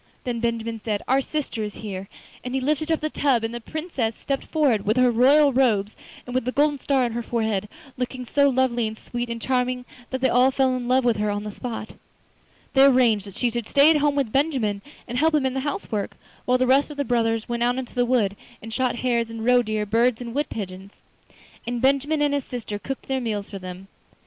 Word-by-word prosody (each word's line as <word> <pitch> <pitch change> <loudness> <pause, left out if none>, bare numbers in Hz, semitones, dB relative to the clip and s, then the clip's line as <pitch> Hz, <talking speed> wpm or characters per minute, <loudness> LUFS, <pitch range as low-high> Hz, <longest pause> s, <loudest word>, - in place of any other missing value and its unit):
Then 240 -2 -2
Benjamin 230 -1 -2
said: 210 -3 -2
'Our 265 +1 +3
sister 275 -5 -3
is 210 -1 -4
here!' 195 -3 -6 0.4
and 250 +1 -4
he - - +2
lifted 305 +4 0
up 320 - +1
the 310 - -1
tub 260 -6 +1
and 225 +1 -2
the 240 - -5
Princess 275 -6 -3
stepped 275 -1 -3
forward, 275 -10 +1
with 215 +4 +1
her 250 -1 +5
royal 275 +5 +5
robes 220 -6 +2 0.3
and 245 - -7
with 255 - +1
the 255 - 0
golden 290 +1 +2
star 270 -1 +1
on 235 - -2
her 235 +1 -3
forehead, 220 -4 -1 0.3
looking 250 0 -4
so 280 +3 +3
lovely 245 -3 +1
and 220 0 -6
sweet 240 +1 -5
and 235 0 -4
charming 250 0 -1 0.2
that 260 - -3
they 260 - +3
all 250 +1 +4
fell 265 -1 +1
in 245 -1 -4
love 255 0 +3
with 235 -3 +3
her 210 0 0
on 205 0 -2
the 210 - -5
spot. 225 0 -6 0.8
They 270 0 +6
arranged 240 -7 +4
that 200 - -11
she 245 -2 0
should 235 -1 -4
stay 285 +3 +6
at 315 - +4
home 290 -1 +2
with 270 -6 0
Benjamin 260 -9 +1 0.3
and 245 0 -2
help 320 0 +3
him 290 -3 +2
in 260 - 0
the 265 - -1
house 300 +9 -4
work, 205 -3 -3 0.3
while 250 0 +3
the 255 - +2
rest 270 +4 +3
of 295 - -9
the 285 - -1
brothers 225 -2 0
went 235 0 -3
out 245 +1 +2
into 260 -2 -5
the 245 - +2
wood 235 -5 +1 0.2
and 225 +1 -9
shot 255 0 0
hares 235 -2 0
and 225 0 -6
roe 250 0 +5
deer, 215 -2 -2
birds 230 +2 +2
and 235 -2 -6
wood 290 +3 -1
pigeons. 190 -1 -7 0.7
And 240 0 -2
Benjamin 280 +4 +2
and 290 -1 +2
his 285 -1 -1
sister 220 -4 -5
cooked 270 +5 -6
their 265 -1 -1
meals 210 -4 -3
for 195 - -6
them. 185 +1 -9
245 Hz, 235 wpm, -24 LUFS, 225-270 Hz, 0.8 s, They